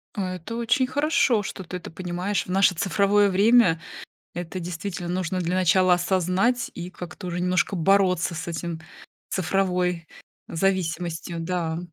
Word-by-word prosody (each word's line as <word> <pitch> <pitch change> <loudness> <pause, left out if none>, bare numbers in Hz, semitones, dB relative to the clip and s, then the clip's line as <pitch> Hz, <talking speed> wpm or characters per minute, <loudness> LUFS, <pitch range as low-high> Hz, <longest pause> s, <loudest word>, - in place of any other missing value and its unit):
А 185 -3 -2
это 180 +6 -7
очень 240 +3 +1
хорошо, 270 -5 +2
что 190 - -6
ты 180 +1 -6
это 180 - -10
понимаешь 180 +3 -2
в - - -14
наше 190 -1 +4
цифровое 200 +3 +3
время. 195 -3 +4 0.5
Это 175 +1 -5
действительно 175 +1 -5
нужно 185 0 -1
для 175 0 -1
начала 185 0 +4
осознать 185 +7 +1
и 175 +1 -6
как-то 180 +1 -9
уже 175 0 -3
немножко 180 +2 +1
бороться 180 -1 +2
с 165 +1 -5
этим, 170 0 -4 0.5
цифровой 180 -2 0 0.4
зависимостью, 170 -2 -1
да. 165 -1 -2
180 Hz, 140 wpm, -24 LUFS, 175-195 Hz, 0.5 s, наше